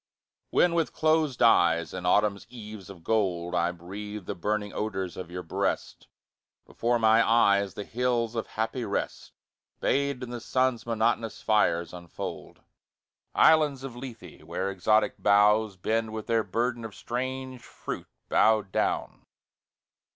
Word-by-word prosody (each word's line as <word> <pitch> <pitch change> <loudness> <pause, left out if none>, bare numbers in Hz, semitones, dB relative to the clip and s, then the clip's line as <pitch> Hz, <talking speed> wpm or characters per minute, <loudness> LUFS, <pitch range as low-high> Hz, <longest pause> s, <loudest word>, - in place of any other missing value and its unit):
When 175 - +3
with 165 -2 0
closed 155 -5 +2
eyes 85 -7 +4
in 90 -1 -4
autumn's 100 +1 +2
eves 105 -5 -10
of 90 -4 -12
gold 90 -5 0
I 85 0 +1
breathe 100 +4 -8
the - - -3
burning 105 +3 -2
odours 95 -4 -3
of 90 - -7
your 90 +1 -6
breast, 80 - -3 0.6
Before 120 +1 0
my 110 0 +5
eyes 100 -4 +3
the 105 - -4
hills 120 0 -1
of 115 -2 -3
happy 115 +3 -3
rest - - -3 0.5
Bathed 140 -2 0
in 125 - -6
the 120 -1 -5
sun's 130 -1 0
monotonous 115 0 0
fires, 85 -6 +2
unfold. 85 -1 -8 0.7
Islands 150 -4 +4
of 135 -3 -7
Lethe 120 -2 -10
where 95 +1 -3
exotic 105 +3 +1
boughs 105 0 +4
Bend 110 +4 -1
with 110 -1 -5
their 115 -1 +1
burden 120 +4 -1
of 110 -3 -8
strange 130 +1 -4
fruit - - -7 0.2
bowed 110 -3 +3
down. - - -2
110 Hz, 140 wpm, -27 LUFS, 100-120 Hz, 0.7 s, my